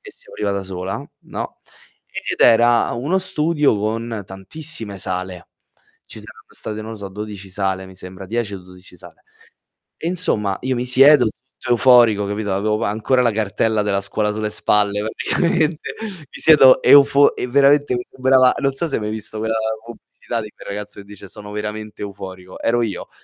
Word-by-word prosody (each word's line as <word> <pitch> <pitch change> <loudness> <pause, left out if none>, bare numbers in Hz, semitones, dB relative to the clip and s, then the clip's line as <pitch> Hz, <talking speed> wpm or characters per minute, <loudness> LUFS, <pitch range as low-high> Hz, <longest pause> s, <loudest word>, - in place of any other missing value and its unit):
e - - -12
si - - -20
apriva 105 -1 -3
da 100 0 -2
sola, 95 +5 -5 0.2
no? - - -7 0.5
Ed - - -5
era 120 +1 +4
uno 145 +11 0
studio 155 - +1
con 110 +1 -3
tantissime 105 +2 -7
sale. 90 -1 -5 0.6
Ci - - -9
saranno - - -14
state, 110 0 -6
non 110 - -8
lo - - -8
so, 100 -2 -7
12 100 0 -8
sale 95 -1 -2
mi 95 - -14
sembra, 95 +1 -10
10 115 -1 -3
o - - -6
12 90 0 -16
sale. 85 -1 -16 0.7
E - - -7
insomma, 115 - 0
io 130 0 -1
mi 120 - -2
siedo 135 +2 +6
tutto 125 +3 -7
euforico, 120 -4 +5
capito, 105 0 -3
avevo 105 +3 -1
ancora 110 +5 +1
la 120 - +3
cartella 110 +1 0
della 100 -1 0
scuola 105 +2 -1
sulle 105 0 -3
spalle, 105 -1 +1
praticamente. 160 - -1
Mi 185 -10 -9
siedo 135 -5 +7
eufor 140 0 +6
e 125 - -3
veramente 140 +1 +4
mi 120 0 -3
sembrava 130 -1 +4
non 140 -1 0
so 170 +5 -2
se 140 - -5
hai - - -3
mai 105 0 -3
visto 110 0 -5
quella 110 +1 -1 0.3
pubblicità 120 0 -7
di 105 - -9
quel - - -14
ragazzo 105 0 -7
che 100 - -14
dice: 100 -1 -12
"Sono 105 +1 -10
veramente 105 0 -6
euforico". 95 -2 -9
Ero 120 +1 +1
io. 110 -4 -4
110 Hz, 180 wpm, -20 LUFS, 100-130 Hz, 0.7 s, siedo